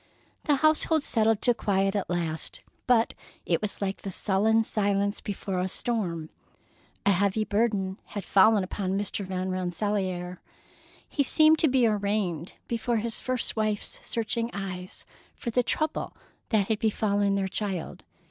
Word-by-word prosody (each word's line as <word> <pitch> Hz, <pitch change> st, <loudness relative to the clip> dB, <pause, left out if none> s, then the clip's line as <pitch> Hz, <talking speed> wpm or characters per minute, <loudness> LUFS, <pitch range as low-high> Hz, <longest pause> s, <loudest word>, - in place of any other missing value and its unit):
The 295 Hz, -, +4 dB
household 310 Hz, +1 st, +3 dB
settled 220 Hz, -4 st, +3 dB
to 245 Hz, -, +5 dB
quiet 195 Hz, -2 st, 0 dB
at 200 Hz, -, -2 dB
last, 165 Hz, -3 st, -3 dB, 0.2 s
but 235 Hz, -2 st, +3 dB, 0.3 s
it -, -, +1 dB
was 210 Hz, -1 st, -3 dB
like 195 Hz, 0 st, -3 dB
the 195 Hz, -, -5 dB
sullen 210 Hz, +4 st, +2 dB
silence 200 Hz, -1 st, 0 dB
before 195 Hz, -2 st, -3 dB
a 180 Hz, -, 0 dB
storm. 180 Hz, -7 st, -2 dB, 0.7 s
A 200 Hz, -, +5 dB
heavy 200 Hz, +3 st, +1 dB
burden 205 Hz, -3 st, 0 dB
had 205 Hz, -3 st, -6 dB
fallen 205 Hz, +1 st, +5 dB
upon 190 Hz, 0 st, -2 dB
Mr. 205 Hz, 0 st, -2 dB
Van 185 Hz, 0 st, -3 dB
Rensselaer. 185 Hz, -1 st, -2 dB, 0.7 s
He 290 Hz, -, -1 dB
seemed 310 Hz, +3 st, +5 dB
to 320 Hz, -, +4 dB
be 260 Hz, -3 st, +3 dB
arraigned 200 Hz, -6 st, -1 dB
before 235 Hz, 0 st, -1 dB
his 225 Hz, +1 st, +1 dB
first 255 Hz, -2 st, -1 dB
wife's 215 Hz, -1 st, -1 dB
searching 230 Hz, 0 st, -1 dB
eyes, 185 Hz, -2 st, -5 dB, 0.3 s
for 235 Hz, -, -4 dB
the 250 Hz, -, +3 dB
trouble 310 Hz, +5 st, -2 dB, 0.3 s
that 210 Hz, -4 st, +2 dB
had 220 Hz, -2 st, 0 dB
befallen 205 Hz, -2 st, +1 dB
their 195 Hz, -1 st, 0 dB
child. 190 Hz, -3 st, -3 dB
205 Hz, 150 wpm, -27 LUFS, 190-225 Hz, 0.7 s, to